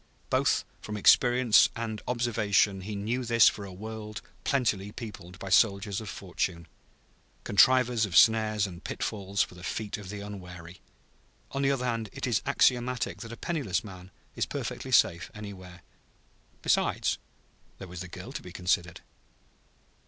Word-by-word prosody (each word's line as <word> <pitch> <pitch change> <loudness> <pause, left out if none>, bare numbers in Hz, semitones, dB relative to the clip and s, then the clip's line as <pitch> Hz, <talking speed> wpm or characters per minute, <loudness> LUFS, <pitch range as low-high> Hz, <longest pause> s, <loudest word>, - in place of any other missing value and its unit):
Both - - +2 0.2
from 105 0 -5
experience 120 +2 +5
and 110 -2 -4
observation 105 -5 +1
he 105 +2 -5
knew 115 +6 -2
this 115 -2 +5
for 100 - 0
a 95 - -9
world 105 +2 -7 0.2
plentifully 110 -7 0
peopled 95 -6 -9
by 95 - -7
soldiers 100 +1 +3
of 110 - -7
fortune, 85 -3 -3 0.8
contrivers 125 +2 +4
of 95 -5 +1
snares 110 -2 +5
and 90 -2 -9
pitfalls 100 -2 -1
for - - -9
the 90 0 -13
feet 105 +1 -4
of 100 -3 -9
the 100 0 -6
unwary. 90 -4 -9 0.7
On 140 - -2
the 135 - +3
other 135 -2 0
hand, 115 -3 -2
it 135 - -4
is 120 -4 +1
axiomatic 125 -3 +1
that 115 - -8
a 115 - -8
penniless 140 - -2
man 95 -3 -11 0.3
is - - -1
perfectly - - -5
safe 85 0 +3
anywhere. 95 -4 -10 0.8
Besides, - - +1 0.6
there 95 - -9
was 90 0 -8
the 90 - -6
girl 90 +7 -9
to - - -6
be 90 - -10
considered. 90 0 -1
105 Hz, 150 wpm, -28 LUFS, 95-115 Hz, 0.8 s, experience